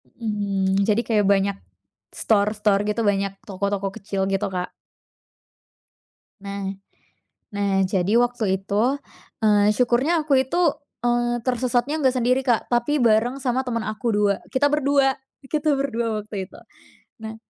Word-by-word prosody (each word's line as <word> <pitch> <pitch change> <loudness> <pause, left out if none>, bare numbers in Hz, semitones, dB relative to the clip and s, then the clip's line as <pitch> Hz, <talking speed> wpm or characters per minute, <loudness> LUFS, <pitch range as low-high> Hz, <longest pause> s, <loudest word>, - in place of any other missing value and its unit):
Mhm, 200 -3 0
jadi 215 +2 +2
kayak 210 -3 +2
banyak 200 0 +2 0.6
store-store 210 -1 +1
gitu, 210 +2 -1
banyak 200 -1 0
toko-toko 200 0 -2
kecil 195 -2 -3
gitu, 195 0 0
Kak. 180 -1 -3 1.7
Nah, 200 0 -5 0.9
nah, 200 -1 +1
jadi 190 +1 0
waktu 230 -6 0
itu, 220 +8 0 0.5
eee, 210 -1 +4
syukurnya 255 +8 +2
aku 275 -3 +4
itu, 265 +6 -3 0.5
eee, 240 0 +1
tersesatnya 255 +3 0
enggak 260 -2 +2
sendiri, 250 +2 +2
Kak, 240 -3 +1
tapi 240 +5 +1
bareng 235 +4 +2
sama 255 0 0
teman 230 -3 -2
aku, 215 +2 -2
2. 205 -1 +2 0.2
Kita 285 +2 +3
berdua 280 -2 +2 0.3
kita 300 0 0
berdua 235 -5 -1
waktu 205 -3 -6
itu. - - -15 0.7
Nah, 220 0 -6
220 Hz, 130 wpm, -23 LUFS, 200-250 Hz, 1.7 s, eee